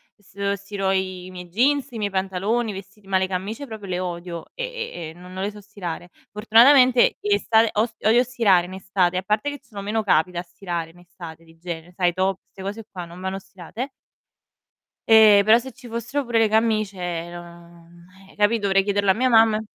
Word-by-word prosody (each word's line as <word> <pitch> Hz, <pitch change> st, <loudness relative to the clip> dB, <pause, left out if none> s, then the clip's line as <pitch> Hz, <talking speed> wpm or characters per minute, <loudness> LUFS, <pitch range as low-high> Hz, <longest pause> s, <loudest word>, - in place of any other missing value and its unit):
uhm, 205 Hz, -, -31 dB, 0.3 s
se -, -, -1 dB
stiro 200 Hz, -1 st, -4 dB
i 185 Hz, -1 st, -2 dB
i -, -, -11 dB
miei 180 Hz, -1 st, -8 dB
jeans, 265 Hz, +8 st, +1 dB
i 230 Hz, -, -7 dB
miei 205 Hz, -1 st, -1 dB
pantaloni, 195 Hz, +4 st, -1 dB
i -, -, -7 dB
vestiti, 195 Hz, +1 st, -11 dB
ma 190 Hz, -1 st, +2 dB
le 190 Hz, -, 0 dB
camicie 205 Hz, +9 st, -4 dB
proprio 215 Hz, -3 st, -8 dB
le 180 Hz, -1 st, -2 dB
odio 175 Hz, -2 st, -5 dB
e -, -, -4 dB
e 470 Hz, -, -5 dB
e, -, -, -11 dB
no 180 Hz, +1 st, -14 dB
non 185 Hz, +1 st, -5 dB
le 205 Hz, -, -2 dB
so 210 Hz, 0 st, -12 dB
stirare. 180 Hz, -4 st, -7 dB, 0.2 s
Fortunatamente 245 Hz, +4 st, +5 dB
in 205 Hz, -1 st, 0 dB
estate 220 Hz, +2 st, +3 dB
ost 220 Hz, +1 st, -2 dB
odio 235 Hz, +3 st, +5 dB
stirare 215 Hz, -8 st, +2 dB
in 185 Hz, -, -10 dB
estate, 185 Hz, -1 st, 0 dB
a -, -, 0 dB
parte 210 Hz, +8 st, 0 dB
che 285 Hz, -, -8 dB
ci 260 Hz, -, -31 dB
sono 200 Hz, -2 st, -7 dB
meno 215 Hz, +2 st, -1 dB
capi 180 Hz, -2 st, +2 dB
da 175 Hz, 0 st, -4 dB
stirare 170 Hz, -1 st, -5 dB
in 170 Hz, -, -20 dB
estate 170 Hz, -2 st, -12 dB
di 165 Hz, 0 st, -20 dB
genere, 170 Hz, 0 st, -7 dB
sai 175 Hz, -1 st, 0 dB
top, 190 Hz, +1 st, 0 dB
'ste 190 Hz, -, -13 dB
cose 205 Hz, +3 st, -5 dB
qua 180 Hz, -2 st, -7 dB
non 175 Hz, +2 st, -12 dB
vanno 190 Hz, +1 st, -3 dB
stirate 195 Hz, -, -8 dB, 1.2 s
e, 215 Hz, -2 st, +8 dB
però 220 Hz, +2 st, +6 dB
se 260 Hz, +2 st, -6 dB
ci 245 Hz, +1 st, -14 dB
fossero 235 Hz, +5 st, -3 dB
pure 235 Hz, -2 st, -1 dB
le 225 Hz, -, +4 dB
camicie, 200 Hz, -6 st, -1 dB
non 170 Hz, 0 st, -13 dB, 0.2 s
eh, -, -, -19 dB
capi', 210 Hz, +2 st, +2 dB
dovrei 195 Hz, -1 st, +2 dB
chiederlo 200 Hz, -1 st, 0 dB
a -, -, +6 dB
mia 255 Hz, +4 st, +1 dB
mamma 225 Hz, -2 st, +5 dB
195 Hz, 215 wpm, -23 LUFS, 180-225 Hz, 1.2 s, e